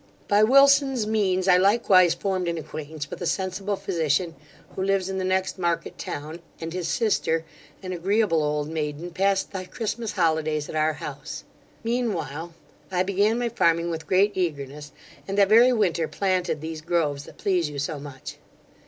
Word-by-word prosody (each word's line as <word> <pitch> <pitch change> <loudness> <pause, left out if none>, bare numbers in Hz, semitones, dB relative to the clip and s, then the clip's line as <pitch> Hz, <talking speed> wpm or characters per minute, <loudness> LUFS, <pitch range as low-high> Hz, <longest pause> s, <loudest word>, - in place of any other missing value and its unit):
'By 205 +1 +4
Wilson's 275 0 +5
means, 195 -4 +1
I 180 -1 +6
likewise 190 -3 +4
formed 190 -3 -2
an 170 0 -1
acquaintance 155 -1 -6
with - - -7
a 175 - -1
sensible 190 +2 -1
physician, 165 -2 -1 0.4
who - - -3
lives 195 -1 +1
in 190 0 -2
the - - -2
next 185 0 0
market 170 -2 -2
town; 155 +3 -6 0.2
and 165 0 -5
his 180 -2 -3
sister, 165 -7 0 0.4
an 185 0 -4
agreeable 190 -1 +1
old 150 0 -1
maiden, 155 +2 -4
passed 195 +2 +1
the 185 -2 -5
Christmas 220 +2 -4
holidays 155 -2 0
at - - -7
our 155 0 +2
house. 145 -1 -7 0.4
Mean 235 -1 0
while 165 +2 -6 0.4
I 180 -1 +2
began 200 +4 +1
my 240 -1 -1
farming 170 -6 +2
with 160 -1 -5
great 195 +3 +3
eagerness, 145 -4 -3 0.4
and 195 +1 -3
that 200 -1 +5
very 235 +4 +7
winter 175 -9 +1
planted 185 -6 -1
these 160 0 -6
groves 155 -4 -1
that - - -14
please 180 -6 0
you 145 - -7
so 140 +2 -3
much. 140 -2 -9
180 Hz, 170 wpm, -25 LUFS, 155-200 Hz, 0.4 s, very